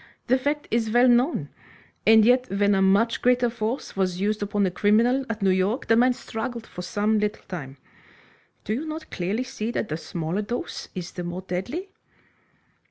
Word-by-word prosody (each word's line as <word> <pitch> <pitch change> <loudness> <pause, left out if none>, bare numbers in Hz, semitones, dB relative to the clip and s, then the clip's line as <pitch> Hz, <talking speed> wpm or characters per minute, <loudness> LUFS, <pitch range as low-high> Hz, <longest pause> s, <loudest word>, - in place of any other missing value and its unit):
The 260 +1 +3
fact 290 +3 -2
is 225 -1 +1
well 240 +3 +5
known. 250 +6 +2 0.6
And 220 -1 +7
yet 250 +2 +3
when 200 +1 +2
a 195 - +2
much 200 +5 +3
greater 245 -1 +3
force 230 +2 -3
was 185 -2 0
used 210 +2 0
upon 205 0 0
a 185 - 0
criminal 230 +8 +2
at 220 -2 -3
New 190 - +4
York, 190 +7 0
the 225 - +4
man 250 +2 +4
struggled 230 0 -5
for 180 - -8
some 210 +4 0
little 210 0 -2
time. 140 -7 -7 0.9
Do 215 - -2
you 285 +8 -3
not 310 0 -7
clearly 195 +7 -2
see 255 -4 -4
that 235 - -2
the 155 - -2
smaller 170 +3 -3
dose 240 +4 -5
is 180 -2 -5
the 180 - -6
more 175 +2 -5
deadly?" 215 - -4
215 Hz, 185 wpm, -25 LUFS, 190-245 Hz, 0.9 s, And